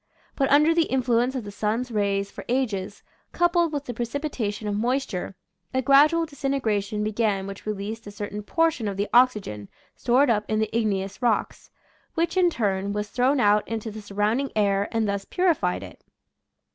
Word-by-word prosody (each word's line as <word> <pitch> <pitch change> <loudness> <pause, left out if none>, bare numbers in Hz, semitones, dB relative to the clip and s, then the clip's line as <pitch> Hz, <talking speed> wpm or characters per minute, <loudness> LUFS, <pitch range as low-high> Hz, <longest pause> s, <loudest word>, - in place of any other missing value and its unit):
But 270 -1 +1
under 300 +3 +5
the 330 -1 +3
influence 250 0 +1
of 255 - -3
the 205 - -8
sun's 220 +4 -2
rays 200 -2 0
for - - -9
ages, 215 -6 -2 0.3
coupled 345 -1 +2
with 290 -2 -3
the 245 - -5
pre 240 +1 -2
cipitation 235 -7 -3
of 205 - -1
moisture, 230 -4 -2 0.4
a 260 - +1
gradual 300 +5 +5
disintegra 270 -8 -1
tion 210 +1 -3
began 210 -2 0
which 195 +1 -9
released 215 +2 -4
a - - -7
certain 205 0 -5
portion 320 -1 0
of 200 -1 -3
the 205 +1 -1
oxygen 210 - +2 0.3
stored 260 +1 +3
up 210 -2 +1
in 215 - 0
the 220 0 -1
igneous 200 -2 -1
rocks, 235 -4 -1 0.5
which, 335 +1 0
in 365 -1 +4
turn, 200 - -1
was 210 0 -3
thrown 260 +5 +2
out 210 -2 +3
into 225 -1 -4
the 215 +1 -8
sur 205 -1 -12
rounding 220 +7 +1
air 200 -1 +2
and 225 -2 0
thus 200 -1 -2
purified 355 - 0
it. - - -12
220 Hz, 185 wpm, -25 LUFS, 205-270 Hz, 0.5 s, under